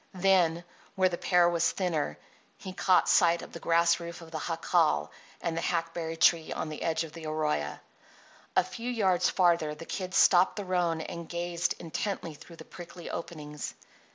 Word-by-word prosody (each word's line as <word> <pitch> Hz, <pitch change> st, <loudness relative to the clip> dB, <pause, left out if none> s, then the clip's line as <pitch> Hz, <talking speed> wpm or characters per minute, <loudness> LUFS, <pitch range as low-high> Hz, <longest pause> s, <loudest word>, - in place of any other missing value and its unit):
Then, 180 Hz, -3 st, +3 dB, 0.3 s
where 185 Hz, -1 st, +3 dB
the 175 Hz, -, -4 dB
pear 175 Hz, -1 st, +4 dB
was 170 Hz, -1 st, +2 dB
thinner, 160 Hz, -, -2 dB, 0.4 s
he 185 Hz, -, -8 dB
caught 185 Hz, -1 st, +3 dB
sight 170 Hz, -1 st, +4 dB
of -, -, -11 dB
the 170 Hz, -, -8 dB
grass 170 Hz, +1 st, +3 dB
roof 170 Hz, 0 st, -7 dB
of 165 Hz, -1 st, -12 dB
the 160 Hz, -, -4 dB
jacal 165 Hz, -, +1 dB, 0.3 s
and 165 Hz, -, -2 dB
the 165 Hz, -, -2 dB
hackberry 165 Hz, -1 st, -2 dB
tree 165 Hz, 0 st, +3 dB
on 155 Hz, -, -3 dB
the 155 Hz, -, -7 dB
edge 160 Hz, 0 st, 0 dB
of 160 Hz, -1 st, -9 dB
the 165 Hz, -2 st, -8 dB
arroyo. 75 Hz, -, -1 dB, 0.8 s
A -, -, +5 dB
few 235 Hz, +1 st, -6 dB
yards 190 Hz, -7 st, +2 dB
farther 170 Hz, -4 st, +2 dB
the 165 Hz, -, -10 dB
Kid 185 Hz, 0 st, -5 dB
stopped 180 Hz, 0 st, +5 dB
the 205 Hz, -2 st, -5 dB
roan 175 Hz, -3 st, 0 dB
and 170 Hz, +1 st, -7 dB
gazed 175 Hz, 0 st, -2 dB
intently 170 Hz, 0 st, -4 dB
through 165 Hz, +3 st, -14 dB
the -, -, -12 dB
prickly 175 Hz, -1 st, -10 dB
openings. 150 Hz, -3 st, -6 dB
170 Hz, 180 wpm, -29 LUFS, 160-180 Hz, 0.8 s, A